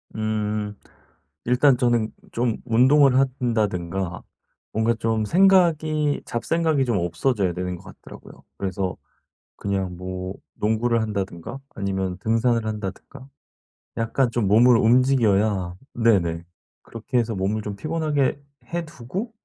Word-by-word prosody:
음음 105 -1 -2 0.7
일단 125 +2 +4
저는 120 -3 +1 0.2
좀 120 -1 0
운동을 130 +3 +5
한다든가 100 -9 -1 0.5
뭔가 110 +2 +2
좀 110 -1 0
생각이 160 - +3
잡생각이 155 +2 0
좀 120 -4 0
없어져야 90 +2 0
되는 90 0 -3
것 - - -16 0.2
같더라고요. - - -13
그래서 95 -1 -2 0.6
그냥 95 -3 -2
뭐 95 +1 -5 0.2
농구를 110 +2 +1
한다든가 100 +2 -4 0.2
아니면 95 -2 -2
등산을 115 +1 +1
한다든가 110 +6 -6 0.7
약간 115 +3 +1
좀 115 -4 0
몸을 115 +4 +6
움직여야 110 -7 +3 0.2
네네. 90 -8 +2 0.4
그렇게 115 +2 -4
해서 115 -2 -1
몸을 100 +3 -1
좀 105 -1 -5
피곤하게 150 0 -1 0.3
해 170 -1 -1
두고 165 - -6
115 Hz, 265 characters per minute, -23 LUFS, 100-130 Hz, 0.7 s, 몸을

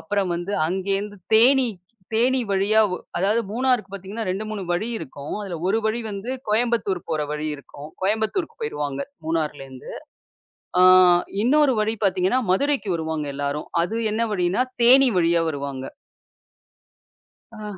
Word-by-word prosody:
அப்புறம் 195 +1 -1
வந்து 175 +4 -5 0.2
அங்கேந்து 195 +2 -2 0.2
தேனிக்கு 235 -4 +5 0.3
தேனி 255 +3 +3
வழியாவு 200 0 +3 0.2
அதாது 200 +6 +2
மூணாருக்கு 235 -4 0
பாத்தீங்கன்னா, 200 +3 -6
2 190 +4 -2
3 210 -3 -5
வழி 175 +6 0
இருக்கும். 145 -5 -8
அதுல 185 -4 -5
ஒரு 200 +4 +2
வழி 225 +2 -1
வந்து 205 +4 -5 0.2
கோயம்பத்தூர் 220 -4 +1
போற 155 -2 0
வழி 150 +1 -3
இருக்கும். 140 +1 -11
கோயம்பத்தூருக்கு 220 - -1
போயிருவாங்க, 145 -2 -3 0.2
மூணார்லேந்து. 150 -5 -4 0.9
ஆ - - +6 0.6
இன்னொரு 280 +3 +3
வழி 215 +1 0
பாத்தீங்கன்னா, 190 +4 +2
மதுரைக்கு 275 +2 +1
வருவாங்க 160 -2 -3
எல்லாரும். 145 +1 -3 0.2
அது 220 +6 -3
என்ன 225 +2 0
வழினா? 185 +4 +1 0.2
தேனி 260 +2 +7
வழியா 170 0 +3
வருவாங்க. 140 -2 -5 1.7
ஆஹ். 210 -2 -7
195 Hz, 130 wpm, -23 LUFS, 165-225 Hz, 1.7 s, தேனி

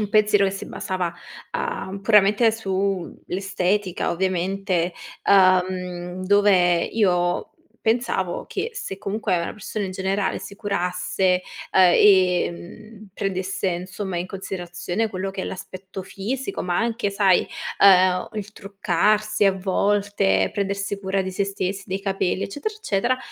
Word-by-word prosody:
un 210 - -1
pensiero 210 -1 +4
che - - 0
si 195 - -6
basava, 180 -2 -3 0.4
uhm, 200 - -4
puramente 210 +2 +5
su 195 -4 -2
l'estetica, 190 0 -1
ovviamente, 185 0 0 0.4
uhm, 185 -1 +2
dove 185 -3 +4
io 180 -5 +1 0.4
pensavo 220 -6 0
che 440 +5 -4
se 195 - -5
comunque 205 -1 -1
una 170 - -3
persona 210 -1 -4
in 185 - -6
generale 190 +1 -1
si 190 +1 -9
curasse, 180 -2 0 0.3
uhm, - - +5
e, 185 0 +5
mhmm, 215 +5 -12
prendesse, 190 -1 -2
insomma, 185 +1 -4
in 175 - -3
considerazione 185 +2 -4
quello 195 -1 -4
che 195 - -5
è - - -3
l'aspetto 190 +1 -7
fisico, 255 - -4
ma 175 -1 -1
anche, 230 -2 0
sai, 195 -2 +4 0.4
uhm, 185 -2 +5
il 210 0 -5
truccarsi 210 +2 +1
a 195 - +4
volte, 190 - +1
prendersi 200 0 -2
cura 190 0 0
di 190 - -4
sé 195 +2 -1
stess 195 0 -3
dei 190 +1 -3
capelli, 195 -1 -1
eccetera, 355 - -4
eccetera, 255 - 0
195 Hz, 135 wpm, -23 LUFS, 185-205 Hz, 0.4 s, puramente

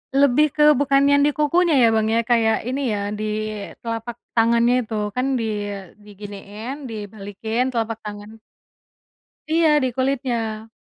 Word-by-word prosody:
Lebih 280 +1 +5
ke 300 - +3 0.2
bukan 275 -1 +3
yang 285 - +5
di 295 - +3
kukunya 330 +3 +2
ya, - - +7
Bang, 220 0 +1
ya, - - +3
kayak 225 -2 +3
ini 270 +3 -2
ya, - - -3 0.2
di - - -3 0.6
telapak 230 0 -4 0.2
tangannya 235 +1 +3
itu. 225 - -7 0.2
Kan 255 +1 0
di - - -2 0.6
diginiin, 205 +4 -8
dibalikin 215 +2 -4
telapak 225 -1 -2
tangan. 210 +1 -9 1.1
Iya, 325 +1 +3 0.2
di - - +2
kulitnya. 240 -5 -2
230 Hz, 140 wpm, -22 LUFS, 220-275 Hz, 1.1 s, ya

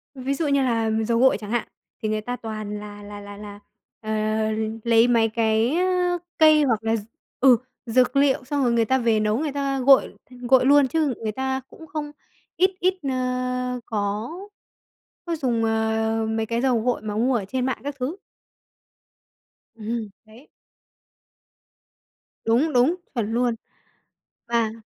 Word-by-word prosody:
Ví 265 +1 -2
dụ 300 +2 -1
như 280 -1 +2
là 230 -3 +1 0.2
dầu 230 0 +2
gội 265 -3 +5
chẳng 210 0 -8
hạn, 240 -2 -1 0.3
thì 215 - -1
người 215 0 -1
ta 245 +3 -4
toàn 215 -2 -6
là 205 0 -10
là 205 0 -9
là 205 0 -10
là, 205 -1 -10 0.4
ờ, 215 - -8 0.7
lấy 230 0 +4
mấy 230 -2 +3
cái, 225 +4 +1
ơ, 360 -1 +1 0.2
cây, 310 -2 +6
hoặc 225 -5 +1
là 225 0 +1
d 215 - -3 0.4
ừ, 255 -3 +6 0.3
dược 250 +4 +2
liệu 275 -2 +3
xong 280 +1 -1
rồi 240 - +2
người 230 -1 +2
ta 260 +3 +2
về 230 -3 +2
nấu 215 +1 +1
người 305 -2 -2
ta 275 -1 -1
gội 270 +1 +4
gội 250 +1 +2
luôn, 285 -1 +6
chứ 300 -2 0
người 220 -1 -3
ta 265 +3 -2
cũng 320 - -13
không 295 0 -5 0.5
ít 375 +2 +4
ít, 370 +1 +2 0.2
ơ, 250 -1 -2
có 210 +1 -2 1.0
có 335 -1 -1
dùng, 240 -5 0
ờ, 220 0 0
mấy 220 0 -1
cái 230 +1 -1
dầu 250 -3 +2
gội 245 -2 -1
mà 210 -1 -4
mua 250 +3 +2
ở 200 - -2
trên 255 +5 -2
mạng 260 - -1
các 285 -1 -3
thứ. 270 +9 -3 1.6
Ừm, 225 -1 -4 0.2
đấy. 225 +7 -17 2.0
Đúng, 255 +7 +2
đúng, 255 +8 +4 0.2
chuẩn 225 -3 -2
luôn. 240 -1 +1 0.9
Và 230 -2 +1
240 Hz, 165 wpm, -23 LUFS, 220-270 Hz, 2.0 s, cây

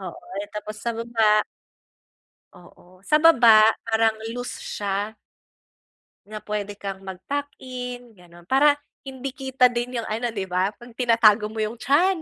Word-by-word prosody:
Oo 185 -3 -7 0.4
tapos 215 0 -7
sa 235 - -2
baba 225 -2 +2 1.1
Oo 180 +1 -19
sa 300 - +5
baba 235 -9 +7 0.2
parang 225 0 +2 0.2
loose 245 0 -6
siya. 205 +2 -3 1.1
Na 215 - -6
pwede 205 -1 -4
kang 195 -1 -6
mag 190 -1 -8
tuck-in 250 -4 -6
ganun. 175 -3 -18
Para 285 +7 +4 0.2
hindi 265 0 -7
kita 265 -2 +1
din 240 +1 -3
yung 230 - -3
ano, 230 +3 -2
di 205 -4 -4
ba 185 +1 0
pag 240 +3 -15
tinatago 230 -3 +4
mo 220 - -10
yung 215 +2 -3
tiyan. 345 +8 +3
225 Hz, 140 wpm, -23 LUFS, 205-250 Hz, 1.1 s, baba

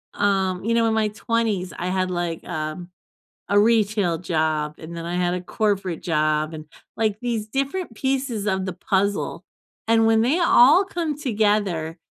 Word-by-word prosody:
um, 190 -2 0
you 230 +2 0
know, 230 0 +3
in 220 - +1
my 220 -1 +1
20s, 210 -5 -1
I 175 - -3
had, 185 0 0
like, 175 -2 -3
um, 155 +1 -5 0.6
a 205 - +3
retail 210 -5 +2
job, 155 -3 -1
and 165 +1 -9
then 165 - -6
I 175 +1 -3
had 180 0 +1
a 180 - -3
corporate 195 -2 -1
job, 155 -1 0
and, 155 0 -8 0.3
like, 215 -2 0
these 230 -3 -2
different 275 - -3
pieces 260 -5 -2
of 190 -2 0
the 185 - -3
puzzle, 195 +3 -1 0.4
and 225 0 +4
when 225 0 +4
they 275 +9 +2
all 325 +2 +6
come 335 -6 -3
together, 205 - 0
200 Hz, 170 wpm, -23 LUFS, 175-230 Hz, 0.6 s, all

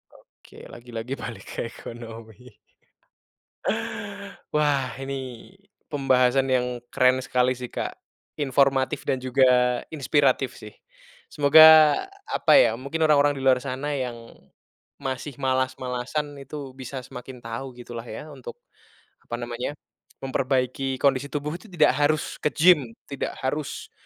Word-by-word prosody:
Oke, - - -20 0.2
lagi-lagi 120 +1 -6
balik 110 -5 -7
ke - - -6
ekonomi. 115 0 -10 2.1
Wah 140 -5 +1
ini 130 -2 -6 0.4
pembahasan 135 -2 +3
yang 125 -1 0
keren 130 +1 +3
sekali 125 0 +1
sih, 125 -1 -4
Kak. - - -4 0.5
Informatif 135 0 +2
dan 130 - -1
juga 130 +1 +1 0.5
inspiratif 135 -3 +1
sih. 105 - -11 0.6
Semoga 155 +1 +8 0.2
apa 440 - +3
ya, - - +5
mungkin 155 +5 -2
orang-orang 145 -2 +4
di 135 - -6
luar 130 -1 +4
sana 135 +2 -4
yang 130 -4 -2 0.9
masih 135 +1 -4
malas-malasan 130 +1 -2
itu 140 0 -8
bisa 130 0 -6
semakin 125 0 -10
tahu 120 +3 -6
gitulah 120 -1 -8
ya 150 +8 -8
untuk 130 -4 -9 0.6
apa 120 - -6
namanya, 120 +4 -4 0.5
memperbaiki 130 0 -1
kondisi 140 0 +3
tubuh 150 +4 -4
itu 225 - -16
tidak 165 -6 +3
harus 150 +1 0
ke - - 0
gym, 150 -7 +4 0.2
tidak 140 - -3
harus 145 +2 -3
130 Hz, 120 wpm, -25 LUFS, 125-145 Hz, 2.1 s, Semoga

